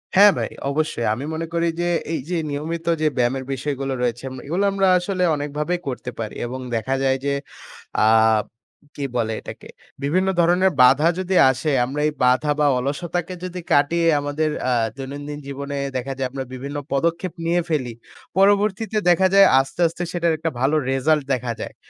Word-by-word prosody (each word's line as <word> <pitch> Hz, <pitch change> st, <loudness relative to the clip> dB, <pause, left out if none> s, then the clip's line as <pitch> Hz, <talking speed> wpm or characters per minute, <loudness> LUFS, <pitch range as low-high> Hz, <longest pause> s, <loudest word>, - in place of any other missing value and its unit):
হ্যাঁ, 200 Hz, +1 st, +8 dB
ভাই -, -, -2 dB, 0.2 s
অবশ্যই। 145 Hz, -5 st, -1 dB
আমি 130 Hz, +6 st, -5 dB
মনে 165 Hz, +1 st, -3 dB
করি 170 Hz, 0 st, +1 dB
যে 175 Hz, -, 0 dB, 0.3 s
এই 155 Hz, -, -1 dB
যে 180 Hz, -, 0 dB
নিয়মিত 160 Hz, +4 st, -4 dB, 0.2 s
যে 155 Hz, -, +3 dB
ব্যায়ামের 130 Hz, +2 st, 0 dB
বিষয়গুলো 135 Hz, 0 st, -3 dB
রয়েছে, 120 Hz, 0 st, -1 dB
এম 130 Hz, -, -8 dB
এগুলো 175 Hz, +7 st, -1 dB
আমরা 195 Hz, -1 st, +2 dB
আসলে 180 Hz, 0 st, -1 dB
অনেকভাবেই 150 Hz, +4 st, -2 dB
করতে 125 Hz, -1 st, -4 dB
পারি। 110 Hz, -2 st, -4 dB
এবং 130 Hz, +2 st, -5 dB, 0.2 s
দেখা 130 Hz, +4 st, -1 dB
যায় 135 Hz, 0 st, +2 dB
যে 140 Hz, -, +1 dB, 0.7 s
আ -, -, +5 dB, 0.9 s
কি 140 Hz, -, -3 dB
বলে 110 Hz, -2 st, 0 dB
এটাকে? -, -, -10 dB, 0.4 s
বিভিন্ন 185 Hz, +7 st, +1 dB
ধরনের 180 Hz, +3 st, +4 dB
বাধা 135 Hz, +6 st, +6 dB
যদি 185 Hz, 0 st, -2 dB, 0.2 s
আসে, 130 Hz, +4 st, -1 dB
আমরা 140 Hz, +4 st, -4 dB
এই 150 Hz, -, -2 dB
বাধা 130 Hz, +4 st, +3 dB
বা 145 Hz, -, +4 dB
অলসতাকে 170 Hz, +7 st, -3 dB
যদি 180 Hz, 0 st, -5 dB
কাটিয়ে 165 Hz, +4 st, +3 dB
আমাদের 145 Hz, +2 st, -1 dB
অ্যা 130 Hz, -, +1 dB, 0.2 s
দৈনন্দিন 145 Hz, +2 st, -6 dB
জীবনে 140 Hz, +1 st, -5 dB, 0.2 s
দেখা 130 Hz, +2 st, -3 dB
যায়, 130 Hz, -1 st, -1 dB
আমরা 135 Hz, 0 st, -5 dB
বিভিন্ন 140 Hz, +3 st, -6 dB, 0.2 s
পদক্ষেপ 170 Hz, +5 st, 0 dB
নিয়ে 175 Hz, +1 st, +2 dB
ফেলি। 135 Hz, -7 st, -1 dB, 0.5 s
পরবর্তীতে 205 Hz, +2 st, +2 dB
দেখা 190 Hz, +2 st, +4 dB
যায় 195 Hz, 0 st, +8 dB
আস্তে, 135 Hz, +6 st, -5 dB
আস্তে 170 Hz, +2 st, -7 dB
সেটার 170 Hz, -1 st, +1 dB
একটা 165 Hz, +1 st, -2 dB
ভালো 140 Hz, +4 st, +2 dB
রিসাল্ট 150 Hz, +3 st, +2 dB
দেখা 120 Hz, -1 st, -3 dB
যায়। -, -, -6 dB
150 Hz, 175 wpm, -22 LUFS, 135-175 Hz, 0.9 s, হ্যাঁ